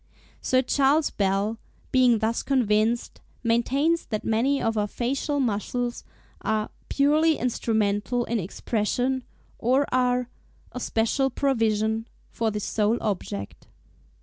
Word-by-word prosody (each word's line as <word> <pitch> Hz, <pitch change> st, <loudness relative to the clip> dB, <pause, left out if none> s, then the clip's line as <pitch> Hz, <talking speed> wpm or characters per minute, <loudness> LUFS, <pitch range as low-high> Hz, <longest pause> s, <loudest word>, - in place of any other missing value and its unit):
Sir 255 Hz, 0 st, +2 dB
C. 275 Hz, -, 0 dB, 0.4 s
Bell, 200 Hz, +3 st, +1 dB, 0.3 s
being 250 Hz, -3 st, +5 dB
thus 220 Hz, +2 st, 0 dB
convinced, 230 Hz, -3 st, +1 dB, 0.2 s
maintains 270 Hz, +8 st, +1 dB
that 215 Hz, -2 st, -3 dB
many 255 Hz, +6 st, +2 dB
of 225 Hz, 0 st, 0 dB
our 210 Hz, -1 st, +1 dB
facial 275 Hz, +6 st, -1 dB
muscles 240 Hz, +1 st, -1 dB, 0.4 s
are 215 Hz, -1 st, -1 dB, 0.2 s
"purely 305 Hz, +3 st, +3 dB
instrumental 225 Hz, 0 st, 0 dB
in 235 Hz, -1 st, -1 dB
expression;" 240 Hz, +7 st, -1 dB, 0.4 s
or 260 Hz, +4 st, +3 dB
are 250 Hz, -1 st, +2 dB, 0.4 s
"a 250 Hz, -, -6 dB
special 240 Hz, +4 st, +1 dB
provision" 225 Hz, -4 st, 0 dB, 0.2 s
for 225 Hz, -1 st, 0 dB
this 210 Hz, -1 st, -3 dB
sole 215 Hz, +2 st, +1 dB
object. 100 Hz, -, -4 dB
235 Hz, 115 wpm, -25 LUFS, 215-260 Hz, 0.4 s, being